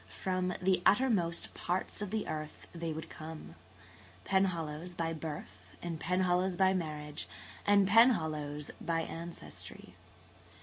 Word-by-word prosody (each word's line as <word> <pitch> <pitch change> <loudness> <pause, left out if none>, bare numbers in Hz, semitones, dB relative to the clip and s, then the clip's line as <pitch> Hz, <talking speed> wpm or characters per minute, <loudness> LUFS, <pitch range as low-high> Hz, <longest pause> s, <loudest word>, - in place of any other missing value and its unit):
From 185 -1 -1
the 185 -1 +3
uttermost 200 -8 +3
parts 180 +4 -2
of 205 - -2
the 215 +1 -1
earth 155 -1 -5
they 165 -1 -3
would 160 +1 -5
come–Penhallows 165 +1 -4
by 165 -1 0
birth, 105 - -7
and 170 -2 -4
Penhallows 180 +1 +2
by 190 0 +5
marriage 150 -4 -3 0.4
and 200 -1 +6
Penhallows 160 - +4
by 165 -1 +1
ancestry. 170 +1 -7
170 Hz, 115 wpm, -33 LUFS, 155-190 Hz, 0.4 s, and